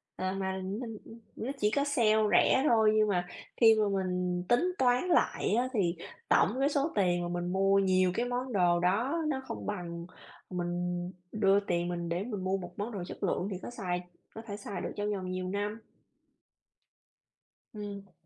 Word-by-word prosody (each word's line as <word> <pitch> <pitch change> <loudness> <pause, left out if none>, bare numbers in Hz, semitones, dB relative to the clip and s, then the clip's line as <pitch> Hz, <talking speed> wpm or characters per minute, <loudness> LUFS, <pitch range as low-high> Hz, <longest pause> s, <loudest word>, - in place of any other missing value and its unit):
Ờ, 185 0 -2
mà 190 -1 -2
minh 220 +3 -5
ưm, 230 +1 -12 0.2
nó 255 +5 -3
chỉ 210 +1 +2
có 280 +3 +2
sale 235 -7 +3 0.2
rẻ 265 - +5
thôi, 220 -2 +5
nhưng 215 0 +4
mà 180 -3 0 0.3
khi 225 -2 +7
mà 210 - +3
mình 180 -2 -1
tính 355 +10 +3
toán 250 +1 +3
lại 335 - +2
á, 250 +2 +2
thì 180 -5 +1 0.3
tổng - - +5
cái 280 +2 +3
số 285 +2 0
tiền 175 -3 +2
mà - - -2
mình 175 +1 -3
mua 195 +1 +4
nhiều 185 -1 +3
cái 240 - 0
món 245 0 -3
đồ 175 -3 +3
đó 235 - +1
nó 265 -3 -1
không - - -6
bằng 170 -4 -4 0.4
mình 180 -2 -2 0.6
đưa 200 -2 +4
tiền 175 -3 -1
mình 170 -1 -3
để 175 +3 -1
mình 210 -5 -4
mua 190 +1 +1
một 175 -2 -8
món 210 +4 -3
đồ 195 -4 -4
chất - - -8
lượng 185 - 0
thì 185 - -3
có - - -5
xài 180 -7 -3 0.3
có 225 - -6
thể 205 0 -5
xài 200 -1 -6
được - - -3
trong 205 0 -1
vòng 185 -2 -4
nhiều 185 0 -3
năm. 205 +3 -3 1.9
Ừm. 200 -2 -7
200 Hz, 195 wpm, -30 LUFS, 180-225 Hz, 1.9 s, khi